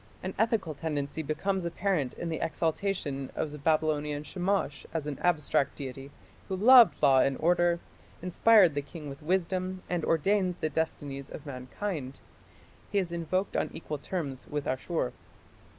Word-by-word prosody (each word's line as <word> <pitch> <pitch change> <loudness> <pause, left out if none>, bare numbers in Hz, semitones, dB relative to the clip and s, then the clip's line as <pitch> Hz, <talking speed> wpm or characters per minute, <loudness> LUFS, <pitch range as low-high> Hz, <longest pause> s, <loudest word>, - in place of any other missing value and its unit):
An 185 +1 -3
ethical 220 -7 +1
tendency 150 0 -3
becomes 185 +5 -1
apparent 170 -5 -1
in 170 - -4
the 160 - -2
exaltation 160 -5 -1
of 150 - -2
the 150 - -8
Babylonian 150 -1 +1
Shamash 180 -4 -1
as 160 -3 -1
an 150 -2 -4
abstract 150 -5 +1
deity 135 0 -7 0.4
who 190 - -2
loved 235 +4 +7
law 135 -2 +6
and 135 0 +2
order, 175 0 +3 0.4
inspired 180 0 +5
the 145 - -1
king 150 0 -9
with 140 +2 -9
wisdom 185 +2 -1
and 175 -2 0
ordained 185 +3 +2
the 155 - -1
destinies 140 -4 -3
of 150 - -9
mankind. 140 +2 -5 0.7
He - - 0
is 185 -3 0
invoked 170 +3 -1
on - - 0
equal 150 -3 -5
terms 140 -5 -4
with 145 -1 -3
Ashur. 130 +1 -1
160 Hz, 150 wpm, -29 LUFS, 145-185 Hz, 0.7 s, loved